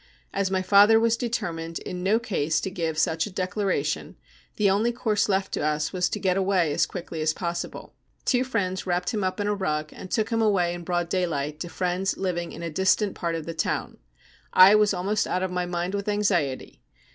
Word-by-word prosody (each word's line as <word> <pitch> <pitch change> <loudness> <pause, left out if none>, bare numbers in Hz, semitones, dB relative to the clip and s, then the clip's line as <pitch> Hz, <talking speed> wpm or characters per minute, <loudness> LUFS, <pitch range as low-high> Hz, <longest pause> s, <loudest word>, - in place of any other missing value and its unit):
As 195 -1 0
my 190 -1 0
father 205 +3 +6
was 230 0 +3
determined 165 -9 -3
in 180 - -6
no 200 +5 +2
c*se 165 -9 0
to 190 - -3
give 165 -4 -2
such 160 +2 +1
a - - -9
declaration, 185 -5 -2 0.4
the 210 - +2
only 205 +5 +2
course 220 -4 0
left 190 0 0
to - - -2
us 150 0 -1
was 180 -1 +1
to 210 - -3
get 185 -2 +1
away 185 -5 +2
as - - +2
quickly 170 -3 -6
as 155 0 +2
possible. 170 -1 -5 0.3
Two 250 -1 +2
friends 190 -8 -2
wrapped 180 0 0
him 210 -3 -1
up 185 +2 -2
in 205 - 0
a 210 - +1
rug, 155 -6 -2
and 185 - -9
took 220 +2 0
him 225 0 +1
away 190 -5 +2
in 175 0 -7
broad 175 0 -1
daylight 155 -5 -2
to 175 - -5
friends 180 +2 -1
living 175 -3 -2
in 170 - -8
a 165 - -4
distant 190 +4 +2
part 170 -2 -2
of 160 -2 -5
the 165 - -5
town. 160 - -2 0.5
I 185 +2 +8
was 210 -1 +4
almost 200 +3 0
out 185 - -1
of 185 - -2
my 180 0 -1
mind 175 +1 -2
with 200 0 -2
anxiety. 175 - -1
185 Hz, 215 wpm, -25 LUFS, 170-205 Hz, 0.5 s, I